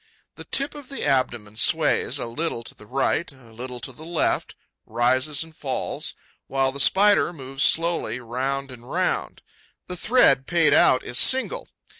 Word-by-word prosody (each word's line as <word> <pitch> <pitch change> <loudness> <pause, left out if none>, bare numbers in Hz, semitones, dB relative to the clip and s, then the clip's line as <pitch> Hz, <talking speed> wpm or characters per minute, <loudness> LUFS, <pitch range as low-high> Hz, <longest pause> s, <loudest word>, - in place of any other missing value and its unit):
The - - -11
tip 275 +1 0
of 290 -3 -11
the 275 - -4
abdomen 120 -6 -1
sways, 150 -1 +2
a 130 - -3
little 120 0 -4
to 120 - -6
the 105 - -17
right, 135 +6 0
a 125 -5 -18
little 125 +2 -7
to - - -3
the 155 - -14
left, 170 0 -1 0.3
rises 130 +6 +1
and 160 -1 -16
falls, 135 -4 -3 0.3
while 135 0 0
the 140 - -7
Spider 200 +5 +4
moves 135 -4 -8
slowly 165 -8 +1
round 130 +3 -3
and 120 0 -13
round. 180 +1 -1 0.4
The 180 - -4
thread 170 - +3
paid 170 -3 +3
out 130 - +4
is 120 - 0
single. 265 - +2
135 Hz, 165 wpm, -23 LUFS, 125-170 Hz, 0.4 s, Spider